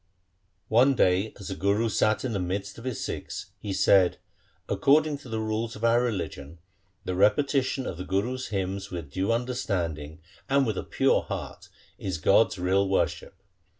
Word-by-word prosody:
One 130 Hz, +5 st, +5 dB
day 95 Hz, 0 st, +2 dB
as 100 Hz, -, -7 dB
the 95 Hz, -, -3 dB
Guru 100 Hz, +4 st, +1 dB
sat 110 Hz, +2 st, +1 dB
in 120 Hz, -, -2 dB
the 100 Hz, -, -1 dB
midst 100 Hz, +3 st, -3 dB
of 115 Hz, -, -11 dB
his 130 Hz, -4 st, -3 dB
Sikhs -, -, -6 dB
he 100 Hz, 0 st, -5 dB
said, 95 Hz, -1 st, +4 dB, 0.3 s
' -, -, -38 dB
According 150 Hz, +1 st, +3 dB
to 135 Hz, -, -12 dB
the 110 Hz, -, -2 dB
rules 110 Hz, +1 st, -2 dB
of 105 Hz, -, -10 dB
our 115 Hz, +1 st, +4 dB
re 120 Hz, -, +1 dB
ligion 75 Hz, -6 st, -6 dB, 0.5 s
the 90 Hz, -, -2 dB
repetition 130 Hz, +7 st, +2 dB
of 85 Hz, -, -4 dB
the 90 Hz, -, -5 dB
Gurus' 120 Hz, +8 st, -2 dB
hymns 95 Hz, -1 st, -3 dB
with 85 Hz, -6 st, -6 dB
due 95 Hz, +8 st, 0 dB
understanding 90 Hz, -, -2 dB, 0.3 s
and 140 Hz, 0 st, +3 dB
with 110 Hz, -5 st, -1 dB
a -, -, -4 dB
pure -, -, +2 dB
heart -, -, -7 dB, 0.3 s
is 95 Hz, -4 st, -3 dB
God's 95 Hz, +7 st, +3 dB
real 95 Hz, +2 st, +1 dB
worship.' 95 Hz, 0 st, -1 dB
100 Hz, 180 wpm, -27 LUFS, 95-120 Hz, 0.5 s, One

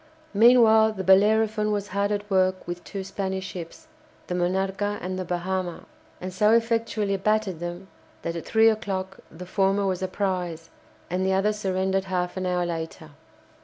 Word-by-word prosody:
Meanwhile 220 Hz, 0 st, +6 dB
the 190 Hz, -2 st, -5 dB
"Bellerophon" 215 Hz, +3 st, +4 dB
was 205 Hz, -1 st, -2 dB
hard 200 Hz, +2 st, 0 dB
at 205 Hz, 0 st, -2 dB
work 185 Hz, -2 st, +1 dB
with 175 Hz, 0 st, -5 dB
two 195 Hz, -2 st, -6 dB
Spanish 190 Hz, -1 st, -3 dB
ships, 180 Hz, -, -8 dB, 0.4 s
the -, -, -4 dB
"Monarca" 190 Hz, +3 st, -1 dB
and 185 Hz, +1 st, -4 dB
the -, -, -2 dB
"Bahama," 180 Hz, 0 st, -3 dB, 0.3 s
and 185 Hz, 0 st, -6 dB
so 210 Hz, +4 st, +4 dB
effectually 225 Hz, -3 st, +1 dB
battered 210 Hz, -3 st, 0 dB
them 175 Hz, +2 st, -6 dB, 0.4 s
that 170 Hz, -, -3 dB
at 170 Hz, -, -5 dB
three 225 Hz, 0 st, +5 dB
o'clock 190 Hz, -3 st, -4 dB
the 180 Hz, +3 st, -10 dB
former 195 Hz, +1 st, +1 dB
was 185 Hz, -1 st, -1 dB
a 185 Hz, -, 0 dB
prize, 180 Hz, -4 st, -3 dB, 0.4 s
and 185 Hz, +1 st, 0 dB
the 190 Hz, 0 st, +1 dB
other 200 Hz, +3 st, +2 dB
surrendered 190 Hz, -1 st, -1 dB
half 180 Hz, -2 st, -2 dB
an 185 Hz, -1 st, -2 dB
hour 180 Hz, -1 st, 0 dB
later. 165 Hz, -2 st, -5 dB
190 Hz, 165 wpm, -25 LUFS, 180-210 Hz, 0.4 s, Meanwhile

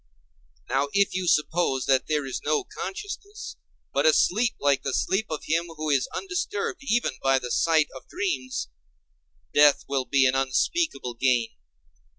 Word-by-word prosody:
Now 135 Hz, +2 st, +1 dB
if 200 Hz, 0 st, +3 dB
you 185 Hz, -1 st, -2 dB
suppose 150 Hz, -4 st, +1 dB
that 130 Hz, -1 st, +2 dB
there 150 Hz, -2 st, 0 dB
is 130 Hz, -, -4 dB
no 435 Hz, -, +1 dB
consciousness, 410 Hz, +1 st, -7 dB, 0.4 s
but -, -, +3 dB
a -, -, +6 dB
sleep 225 Hz, -, +2 dB
like 140 Hz, -1 st, +2 dB
the 135 Hz, -, -2 dB
sleep 200 Hz, +3 st, 0 dB
of 155 Hz, -, -4 dB
him 165 Hz, +2 st, 0 dB
who 155 Hz, 0 st, -1 dB
is 135 Hz, -2 st, +2 dB
undisturbed 390 Hz, +2 st, -3 dB
even 240 Hz, -, 0 dB
by 135 Hz, 0 st, +3 dB
the 125 Hz, -2 st, -4 dB
sight 160 Hz, -3 st, +3 dB
of 130 Hz, -, -11 dB
dreams, 350 Hz, -, -3 dB, 0.8 s
death 145 Hz, -1 st, +5 dB
will 135 Hz, -2 st, -1 dB
be 135 Hz, -1 st, +3 dB
an 130 Hz, -, +3 dB
unspeakable 135 Hz, -, 0 dB
gain. 120 Hz, -1 st, +1 dB
155 Hz, 160 wpm, -26 LUFS, -, 0.8 s, a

